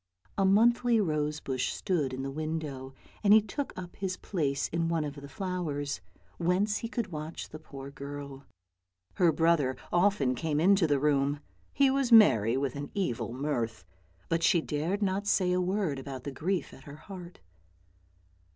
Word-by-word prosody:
A 195 - +2
monthly 230 +4 +4
rose 150 -5 0
bush 130 -3 -2
stood 160 -9 -1
in 130 +1 -4
the 135 - -3
window, 150 -3 -4 0.3
and 205 0 +6
he 220 - +9
took 220 +7 -4
up 180 -1 -7
his 190 -2 -3
place 145 -8 -1
in 165 0 -1
one 165 -2 0
of 145 -1 -4
the 140 -1 -10
flowers, 150 -5 -3 0.4
whence 185 +5 +1
he 230 - -5
could 235 -5 -3
watch 155 +1 -6
the 155 - -9
poor 140 -3 -9
girl. 140 -1 -8 0.7
Her 175 -3 +5
brother 160 -6 +2 0.2
often 175 -8 +3
came 150 +3 -1
into 190 +1 +4
the 145 -2 +2
room. 145 0 +1 0.3
He 275 -1 +3
was 270 -2 0
merry 120 - +6
with 135 -1 -1
an 145 0 -5
evil 175 - -1
mirth, 120 - -3 0.4
but 165 0 0
she 170 +1 +4
dared 165 +7 -2
not 200 +1 -1
say 185 -3 +2
a 180 0 +2
word 180 -6 -1
about 135 -2 -7
the 140 - -4
grief 175 +7 -2
at 135 - -14
her 140 - -9
heart. 180 +1 -10
160 Hz, 170 wpm, -29 LUFS, 140-190 Hz, 0.7 s, he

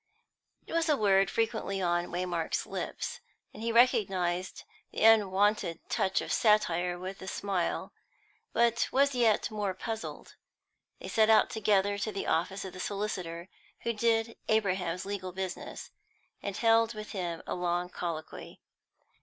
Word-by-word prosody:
It - - -9
was 330 -1 +1
a 295 - +4
word 195 -3 +4
frequently 220 -3 -1
on 175 -1 +1
Waymark's 175 -2 -2
lips, - - -4 0.3
and - - -10
he 230 +1 -1
recognised 190 -7 +2 0.3
the - - -3
unwonted 205 -5 +4
touch 190 0 +1
of - - -3
satire 180 -5 +2
with 185 +2 -7
a 190 - -8
smile, 190 -2 -2 0.6
but 235 0 +2
was 280 +1 +3
yet 235 -2 +2
more 205 -3 -2
puzzled. 220 +2 -6 0.7
They - - -8
set 220 0 +3
out 220 - +5
together 205 -2 +2
to 215 +2 -2
the 200 - -4
office 190 +4 0
of 190 - -7
the 185 - -9
solicitor 185 -4 -4 0.3
who 235 - -1
did 225 +1 +1
Abraham's 185 -5 0
legal 190 -2 -4
business, 190 0 -6 0.5
and 200 -1 -4
held 230 0 +3
with 215 0 -7
him 175 -4 -4
a - - -3
long 175 0 -1
colloquy. 165 -3 -6
195 Hz, 145 wpm, -30 LUFS, 180-220 Hz, 0.7 s, out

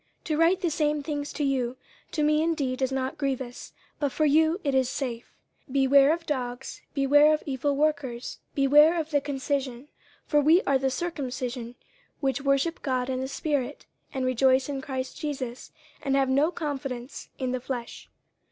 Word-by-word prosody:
To 310 - -1
write 335 +4 +3
the 345 -4 0
same 300 -1 0
things 290 -1 -3
to 295 - -2
you, 260 -3 0 0.3
to 305 - 0
me 305 +1 +3
indeed 285 -6 -1
is 260 0 +1
not 265 0 -2
grievous, 265 -2 -3 0.3
but 285 -2 0
for 310 - +1
you 315 +4 +3
it 280 -2 0
is 260 -2 +2
safe. 245 -4 -4 0.4
50:003:002 - - -10
Beware 275 +1 +5
of 335 0 -13
dogs, 250 -3 -4
beware 290 +2 +5
of 305 - -8
evil 280 +1 -1
workers, 275 -5 -1 0.2
beware 295 +4 +6
of 320 0 -4
the 290 -1 +2
concision. 270 -3 -2 0.4
50:003:003 - - -38
For 295 -1 +4
we 320 +6 +5
are 275 -1 +2
the 265 0 +1
circumcision, 255 -6 -4 0.4
which 270 -1 0
worship 275 +4 +1
God 255 -1 -1
in 255 - -1
the 260 - -2
spirit, 285 -1 -2 0.3
and 265 -2 -2
rejoice 260 +1 +3
in 280 -2 -3
Christ 260 -1 -5
Jesus, 265 -5 -5 0.3
and 275 -1 0
have 270 -1 +2
no 280 +4 +3
confidence 275 -6 -5
in 255 -3 -2
the 255 0 -2
flesh. 245 -2 -6
275 Hz, 180 wpm, -27 LUFS, 260-300 Hz, 0.4 s, beware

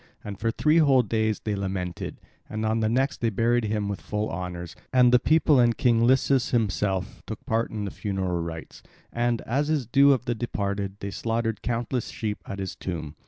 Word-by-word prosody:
And 100 -2 -7
for 115 - 0
three 150 +7 +3
whole 135 -5 +5
days 110 0 0
they 105 -1 -2
lamented; 95 -3 -4 0.3
and 110 0 -3
on 110 +1 +1
the 110 -1 +1
next 135 +4 0
they 115 - +2
buried 115 +3 +1
him 105 -1 -1
with 100 -1 -4
full 105 +1 -3
honours, 90 -1 -5 0.2
and 125 -1 +5
the 125 - +6
people 155 0 +4
and 120 -1 +3
King 120 -2 +3
Lycus 130 0 +3
himself 100 -5 -1
took 110 - -7
part 115 +1 0
in 105 -2 -4
the 100 - -4
funeral 95 -4 -2
rites; 80 -1 -7 0.3
and, 120 -1 0
as 140 +6 -1
is 150 -5 +1
the 115 - -28
due 140 +1 +6
of 130 -3 +1
the 120 - 0
departed, 100 -4 -3
they 100 - -4
slaughtered 115 +2 -2
countless 120 +1 -2
sheep 110 -4 -4
at 100 - -5
his 95 -2 -4
tomb. 80 -4 -5
110 Hz, 205 wpm, -26 LUFS, 100-120 Hz, 0.3 s, the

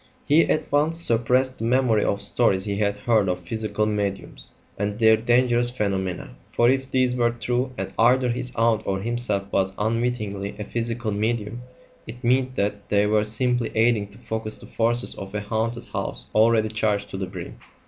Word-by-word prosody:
He 155 +3 +4
at - - 0
once 155 +3 +2
suppressed 130 -1 +2
the - - -4
memory 120 -3 +2
of 100 0 0
stories 100 -3 +2
he 100 -1 -2
had 100 -1 +1
heard 110 -5 +1
of 90 0 -2
"physical 105 +3 -2
mediums" 100 -2 -3 0.3
and 105 +1 -2
their 110 -1 +6
dangerous 120 +1 +2
phenomena; 95 -6 -3 0.2
for 120 +1 +4
if 135 0 -1
these 130 -1 +1
were 120 -1 +2
true, 120 +2 -2
and 95 0 -5
either 125 +2 +4
his 125 +1 -3
aunt 115 -1 +2
or 95 0 0
himself 115 -2 -1
was 95 0 +1
unwittingly 110 -3 -2
a 105 - -4
physical 115 +1 -3
medium, 110 +2 -2 0.5
it 120 +3 -9
meant 130 +1 +1
that 100 -1 -2
they 100 0 +3
were 105 0 +2
simply 120 +2 0
aiding 110 -2 +2
to 100 +1 -17
focus 110 -2 -4
the - - -12
forces 120 +2 0
of 95 +1 -8
a 105 - -1
haunted 110 +3 -2
house - - -3
already 110 0 +4
charged 105 -2 -1
to - - -5
the 95 -1 -3
brim. 90 -2 -8
110 Hz, 180 wpm, -24 LUFS, 105-120 Hz, 0.5 s, their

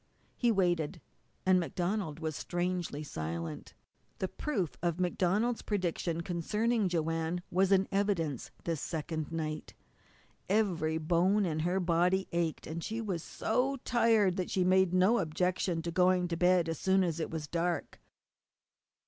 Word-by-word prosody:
He 240 -2 +2
waited. 175 -4 +1 0.5
And 185 -1 +5
MacDonald 175 -2 -2
was 160 -2 -3
strangely 175 -3 -2
silent. 80 - -5 0.4
The 190 - -1
proof 190 - -2
of 170 0 -1
MacDonald's 190 +6 +1
prediction 175 -4 -1
concerning 210 +5 0
Joanne 165 +1 -1
was 190 +2 +2
in 195 0 +4
evidence 190 - 0
this 165 -4 -2
second 160 -1 -3
night. 155 -2 -4 0.7
Every 175 -7 +1
bone 180 +6 +2
in 155 -3 -1
her 175 +4 +1
body 180 +2 +2
ached, 170 -2 -1
and 165 +1 -5
she 220 +1 -3
was 195 -7 -2
so 250 - 0
tired 225 -6 +3
that 185 - -2
she 185 - +1
made 185 0 +4
no 190 +6 +4
objection 175 0 0
to 170 - -3
going 180 0 +3
to - - -2
her - - -6
bed 180 -1 +4
as 165 -2 -3
soon 190 0 +3
as 170 -2 -1
it 160 - -2
was 160 -2 -4
dark. 170 +2 -2
175 Hz, 150 wpm, -31 LUFS, 165-190 Hz, 0.7 s, And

